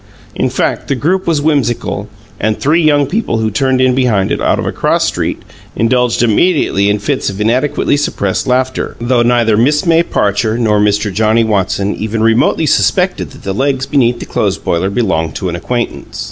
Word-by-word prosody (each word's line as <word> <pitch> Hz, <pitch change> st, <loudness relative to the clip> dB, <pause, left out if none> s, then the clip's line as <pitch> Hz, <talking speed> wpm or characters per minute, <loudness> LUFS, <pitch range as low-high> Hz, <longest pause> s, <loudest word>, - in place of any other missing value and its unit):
In -, -, -1 dB
fact, -, -, -2 dB
the 140 Hz, -, 0 dB
group 180 Hz, +9 st, -1 dB
was 155 Hz, -4 st, +1 dB
whimsical, 140 Hz, -7 st, -1 dB, 0.3 s
and 110 Hz, +1 st, 0 dB
three 155 Hz, +5 st, +2 dB
young 145 Hz, -2 st, +3 dB
people 180 Hz, -, -2 dB
who 110 Hz, -1 st, -1 dB
turned 130 Hz, +4 st, +1 dB
in 130 Hz, 0 st, +3 dB
behind 120 Hz, -7 st, +1 dB
it, -, -, -1 dB
out -, -, +1 dB
of -, -, -3 dB
a -, -, -1 dB
cross -, -, 0 dB
street, -, -, -3 dB, 0.3 s
indulged 120 Hz, +1 st, +1 dB
immediately 115 Hz, -, +2 dB
in 105 Hz, -, +1 dB
fits 105 Hz, -, -2 dB
of 100 Hz, 0 st, -7 dB
inadequately 125 Hz, +8 st, +1 dB
suppressed 100 Hz, -9 st, -2 dB
laughter, 130 Hz, +1 st, -1 dB
though 120 Hz, +1 st, +1 dB
neither 120 Hz, -2 st, +2 dB
Miss 150 Hz, +8 st, +2 dB
May 165 Hz, -1 st, +4 dB
Parcher 110 Hz, -6 st, 0 dB
nor 110 Hz, -3 st, +1 dB
Mr. 105 Hz, 0 st, +1 dB
Johnnie 110 Hz, +3 st, +2 dB
Watson 100 Hz, -1 st, 0 dB
even 110 Hz, +1 st, -3 dB
remotely 115 Hz, 0 st, +2 dB
suspected -, -, +1 dB
that -, -, -15 dB
the 95 Hz, -, -3 dB
legs 135 Hz, +3 st, -1 dB
beneath 125 Hz, -4 st, +1 dB
the -, -, -6 dB
clothes -, -, -1 dB
boiler 85 Hz, +3 st, -1 dB
belonged 95 Hz, -8 st, -1 dB
to 95 Hz, -, -3 dB
an 85 Hz, -, -4 dB
acquaintance. 120 Hz, +7 st, -4 dB
120 Hz, 190 wpm, -13 LUFS, 105-135 Hz, 0.3 s, May